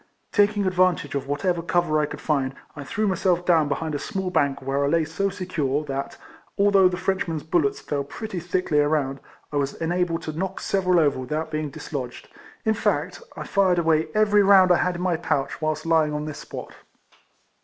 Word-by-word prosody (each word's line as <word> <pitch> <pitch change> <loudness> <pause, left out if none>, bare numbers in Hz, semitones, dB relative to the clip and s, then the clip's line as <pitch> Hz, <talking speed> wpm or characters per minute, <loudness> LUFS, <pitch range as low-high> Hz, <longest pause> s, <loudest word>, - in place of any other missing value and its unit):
Taking 205 -1 +2
advantage 185 -2 +1
of 140 -1 -3
whatever 170 +5 0
cover 170 -2 +1
I 150 - +1
could - - -8
find, 135 -3 0 0.2
I 145 - -7
threw 215 +10 -2
myself 180 -2 +1
down 165 -4 +4
be 140 - +1
hind 160 +1 -4
a 145 - -2
small 190 +4 -3
bank, 140 -5 +1
where 135 +1 -1
I - - +2
lay 165 +2 +2
so 195 +6 -1
secure, 165 -7 -2
that, 140 -1 -4 0.4
although 200 -2 +5
the 180 0 -2
Frenchmen's 180 -4 -2
bullets 160 -4 +1
fell 140 -1 -2
pretty 190 +7 -6
thickly 175 -3 0
around, 145 -2 +1 0.3
I - - 0
was 140 -1 -1
enabled 170 0 -1
to 155 - -4
knock 190 +4 -3
seve 190 -2 -1
ral 180 -1 +5
over 145 -4 +2
without 155 +5 -3
being 155 -1 -2
dislodged; 140 -4 -7 0.4
in 220 - +3
fact, 185 -5 -1 0.2
I - - -4
fired 190 -3 +2
away 160 -2 +2
every 210 -1 +4
round 190 -2 +6
I 175 - +6
had 180 0 0
in 175 - -5
my 180 -3 +1
pouch 145 -3 -2
whilst 155 0 -1
lying 160 -2 +2
on 150 0 -3
this 155 -1 -6
spot. - - -8
165 Hz, 200 wpm, -24 LUFS, 145-185 Hz, 0.4 s, round